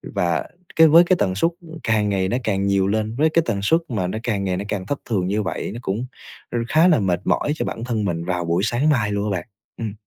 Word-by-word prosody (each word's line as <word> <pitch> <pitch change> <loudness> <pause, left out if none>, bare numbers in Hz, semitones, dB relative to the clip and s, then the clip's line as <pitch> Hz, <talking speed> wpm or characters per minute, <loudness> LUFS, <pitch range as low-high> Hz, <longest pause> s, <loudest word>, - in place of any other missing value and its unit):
Và 85 -2 0 0.3
cái 160 0 +7
với 165 +3 +7
cái 185 +1 +3
tần 95 -2 +1
suất 165 - +2 0.3
càng 110 -2 +1
ngày 95 -1 0
nó 120 - 0
càng 100 -2 0
nhiều 100 -1 +2
lên, 110 +2 -1
với 155 +4 +3
cái 165 +1 +2
tần 105 -4 -1
suất 165 +11 +3
mà 105 -7 -1
nó 100 - -3
càng 100 -5 -1
ngày 90 -1 -1
nó 100 - -4
càng 100 -3 -3
thất 140 +7 -3
thường 95 -5 0
như 105 +2 0
vậy 95 - -4
nó 115 - -6
cũng, 105 +6 -2 0.5
ư, 120 - -1
khá 160 +3 +5
là 160 -9 +4
mệt 90 -3 0
mỏi 145 - +1
cho - - -3
bản 115 - -5
thân 115 -4 -1
mình 85 -2 -2
vào 90 -1 -2
buổi 85 +3 0
sáng 120 +7 +1
mai 115 -8 +1
luôn 100 0 -1
á 90 - -1
bạn, - - -13 0.3
ừm. 110 -3 -4
105 Hz, 270 wpm, -21 LUFS, 95-120 Hz, 0.5 s, cái